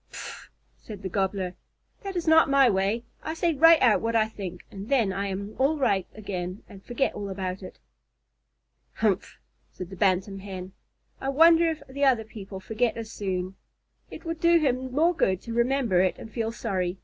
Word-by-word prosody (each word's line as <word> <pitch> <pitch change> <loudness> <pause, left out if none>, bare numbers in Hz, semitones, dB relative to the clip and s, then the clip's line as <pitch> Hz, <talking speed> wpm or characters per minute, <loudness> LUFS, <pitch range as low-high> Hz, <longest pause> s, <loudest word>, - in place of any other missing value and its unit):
"Pffff!" - - -9 0.3
said 210 -3 -10
the 190 - -3
Gobbler. 190 -1 -1 0.5
"That 390 -2 -6
is 345 -2 -2
not 320 -2 +6
my 275 -3 +5
way. 200 +4 0 0.2
I 315 - -4
say 335 0 +1
right 325 +2 +7
out 230 -4 +5
what 230 0 -1
I 220 -1 +3
think, 185 -5 -8
and 200 +2 -8
then 235 -9 +2
I 200 +1 -2
am 200 +2 -5
all 285 +4 +2
right 200 -9 +1
again 185 -3 -5
and 195 -1 -13
forget 250 +2 -1
all 205 -1 -5
about 190 -1 -4
it." 185 - -10 1.2
"Humph!" - - 0 0.3
said 185 0 -8
the - - -7
Bantam 195 +1 +1
Hen. 190 -1 -7 0.5
"I 270 - -3
wonder 330 +4 +6
if 320 -1 -5
the 280 +2 -4
other 255 -5 +4
people 195 -3 -9
forget 220 +4 -1
as 225 -1 -6
soon? 185 -3 -3 0.6
It - - -10
would 330 -1 -4
do 340 0 +5
him 260 -4 0
more 325 +6 +3
good 190 - +1
to 230 - -6
remember 235 -5 +2
it 185 -1 +1
and 225 - -10
feel 225 -2 -2
sorry. 190 -6 -2
220 Hz, 190 wpm, -26 LUFS, 190-275 Hz, 1.2 s, right